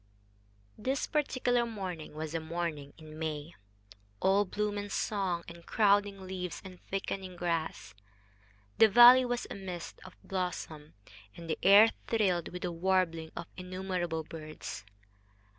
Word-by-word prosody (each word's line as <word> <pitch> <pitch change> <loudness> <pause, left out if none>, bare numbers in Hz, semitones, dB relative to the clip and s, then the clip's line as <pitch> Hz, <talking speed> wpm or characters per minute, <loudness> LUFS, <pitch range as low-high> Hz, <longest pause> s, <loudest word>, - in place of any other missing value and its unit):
This 270 +2 -1
particular 255 -5 +1
morning 185 -9 -6
was 155 0 -5
a 165 - 0
morning 160 -3 -4
in 155 -1 -11
May 155 0 -4 0.7
all 195 - +3
bloom 210 +2 -2
and 205 0 -6
song, 190 -5 -1
and 170 0 -11
crowding 205 -1 +2
leaves 180 -2 -5
and 185 -1 -11
thickening 190 -1 -4
grass. 165 - -3 0.9
The 220 - +8
valley 240 +4 +9
was 245 -1 -2
a - - -4
mist 180 -3 -7
of 185 - -13
blossom, 170 -5 -4 0.4
and 170 - -9
the 160 - -2
air 205 +3 +8 0.2
thrilled 190 -7 +1
with 180 0 -7
the 180 - -1
warbling 170 -2 0
of 170 - -5
innumerable 180 -3 -3
birds. 155 -10 -8
180 Hz, 135 wpm, -31 LUFS, 165-205 Hz, 0.9 s, valley